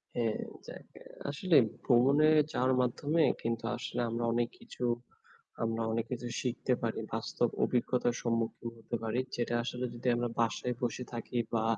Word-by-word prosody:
হ্যাঁ, 115 -2 +1 0.3
যাক। - - -9 0.4
আসলে 155 +3 +3 0.3
ভ্রমণে 140 +5 +5 0.2
যাওয়ার 130 -2 +2
মাধ্যমে 145 +6 +2 0.2
কিন্তু 115 0 -1
আসলে - - -3
আমরা 115 +1 -2
অনেক 120 0 +1
কিছু 235 - -8 0.8
আমরা 115 0 0
অনেক 115 0 0
কিছু 120 -1 -3
শিখতে 125 0 0
পারি। 115 -1 -1
বাস্তব 115 +1 0
অভিজ্ঞতার 120 0 +1
সম্মুখীন 115 0 -1
হতে 115 +1 -5
পারি। 115 +2 0 0.2
যেটা 120 0 0
আসলে 125 +1 -3
যদি 120 +1 -5
আমরা 120 0 0
বাসায় 120 +1 +1
বসে 125 +1 -1
থাকি 120 +1 -4 0.2
বা 110 - +2
120 Hz, 150 wpm, -32 LUFS, 115-125 Hz, 0.8 s, ভ্রমণে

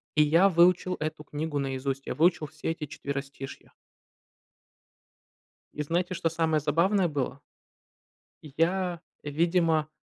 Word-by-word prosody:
И 150 - +6
я 165 +6 +5
выучил 180 +1 +4
эту 155 0 -4
книгу 150 0 -3
наизусть, 135 0 -3
я - - -2
выучил 165 -1 +3
все 155 +2 -4
эти 165 -2 -5
четверостишья. 140 -1 -7 2.0
И 150 - -2
знаете, 170 +4 -1
что 165 - 0
самое 160 -1 +1
забавное 170 +6 +2
было? 140 -2 -3 1.0
И 150 - -12
я, 175 +1 +1 0.2
видимо, 160 +1 +1
155 Hz, 120 wpm, -28 LUFS, 145-170 Hz, 2.0 s, И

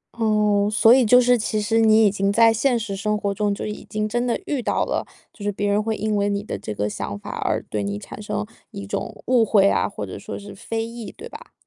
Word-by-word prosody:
哦， 210 -2 +2
所 225 +2 +6
以 260 -1 +5
就 250 +3 +6
是 245 -1 +4
其 215 0 -1
实 225 +2 +1
你 220 0 +5
已 200 - +4
经 200 0 0
在 225 +1 +5
现 245 +2 +2
实 215 -3 -4
生 210 +2 -1
活 200 -1 -2
中， 205 0 0
就 - - -5
已 210 - -6
经 215 0 -1
真 240 +3 -1
的 235 - 0
遇 285 -7 -2
到 - - 0
了， - - -1 0.3
就 210 - -17
是 205 - 0
别 205 +1 -2
人 205 +1 +2
会 220 0 -1
因 215 0 -1
为 205 0 +1
你 200 0 -2
的 - - -5
这 - - -6
个 105 +1 -1
想 100 0 -5
法 - - -8
而 - - -1
对 105 - -4
你 100 0 -3
产 105 - -9
生 210 0 -3 0.2
一 200 -3 -8
种 215 +2 -5
误 245 -2 +4
会 200 -2 +4
啊， - - +1
或 105 - -6
者 95 - -8
说 - - -7
是 205 0 -10
非 225 +3 -4
议， 230 -1 -8
对 465 - -8
吧？ 480 +1 -12
210 Hz, 285 characters per minute, -22 LUFS, 200-225 Hz, 0.3 s, 所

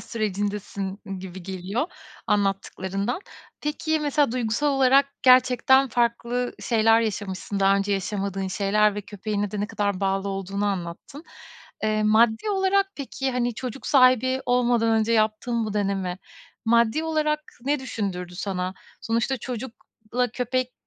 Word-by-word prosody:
sürecindesin 205 -2 -3 0.2
gibi 185 -1 -8
geliyor 190 - -3 0.4
anlattıklarından. 195 - -1 0.4
Peki, 310 +1 -1
mesela 290 -3 +1
duygusal 245 +3 0
olarak 270 0 +4 0.2
gerçekten 255 +1 +5
farklı 240 +1 0
şeyler 225 -1 +4
yaşamışsın. 200 -2 -3
Daha 195 0 +5
önce 200 +1 0
yaşamadığın 195 -1 -2
şeyler 205 +2 +2
ve 205 - -3
köpeğine 205 0 -3
de 210 - -3
ne 205 - -1
kadar 205 -3 -2
bağlı 195 0 0
olduğunu 195 +1 -3
anlattın. 195 - -5 0.6
Eee, 215 0 +1
maddi 220 - +3
olarak, 390 0 +2
peki, 270 -1 -3
hani, 245 -2 0
çocuk 255 +2 -6
sahibi 260 -1 +4
olmadan 240 -2 +2
önce 225 +2 0
yaptığın 220 +2 +1
bu 210 - -4
deneme, 195 -3 -1 0.5
maddi 235 +6 +3
olarak 305 -1 0 0.2
ne 285 0 +1
düşündürdü 185 -8 -4
sana? 185 0 -3 0.3
Sonuçta 230 +4 0
çocukla 245 -1 -4
köpek 255 +1 -1
220 Hz, 125 wpm, -25 LUFS, 200-255 Hz, 0.6 s, gerçekten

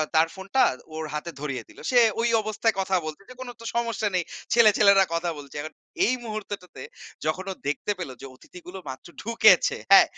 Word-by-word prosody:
তার 160 +1 +5
ফোনটা 195 +7 0 0.3
ওর 160 0 -4
হাতে 150 +3 -4
ধরিয়ে 140 -3 -4
দিল। - - -16
সে 245 - +6 0.2
ঐ - - +2 0.2
অবস্থায় 215 +1 0
কথা 190 0 0
বলছে 155 +4 -7
যে - - -9
কোনো 250 -1 -6
তো - - -10
সমস্যা 230 -3 0
নেই। 180 - +1 0.3
ছেলে 230 -3 +7
ছেলেরা 200 -2 +6
কথা 170 +1 -1
বলছে। 140 -2 -11
এখন 155 +1 -7 0.3
এই - - +2
মুহূর্তটাতে 205 - -7 0.4
যখন 170 +5 -1
ও - - -3
দেখতে 145 +8 -1
পেল 175 - -4
যে, - - -8
অতিথিগুলো 180 +7 -11
মাত্র 130 - -8
ঢুকেছে, 220 -4 +4
হ্যা? 195 - +10
190 Hz, 190 wpm, -25 LUFS, 155-215 Hz, 0.4 s, হ্যা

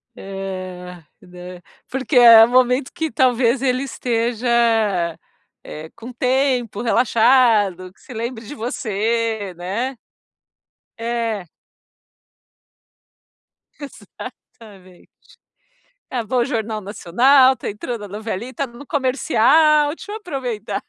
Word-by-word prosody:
É, 185 -2 -7 0.2
né. 180 0 -11 0.3
Porque 265 +1 -1
é 230 -2 +9
o 230 - +3
momento 255 +1 +2
que, 320 -1 -3
talvez, 250 -1 +2
ele 255 0 0
esteja, 240 -2 -2 1.2
eh, 155 +1 -9
com 235 +2 -10
tempo, 250 -3 0
relaxado, 225 -6 +2
que - - -28
se - - -12
lembre 230 0 -5
de 210 - -8
você, 225 -4 -2
né? 215 +10 -3 1.0
É. 230 -4 -3 2.3
Exatamente. 200 -9 -13 1.0
É 245 -3 -3
bom 250 +4 -2
o 240 - +2
Jornal 220 -2 -3
Nacional, 255 +8 +4
está - - -6
entrando 210 +2 -6
a - - -9
novelita, 220 +6 -5
no 240 +4 -13
comercial. 295 +2 +3
Deixa 410 - -10
eu 430 - -4
aproveitar! 260 - -5
235 Hz, 105 wpm, -20 LUFS, 205-255 Hz, 2.3 s, é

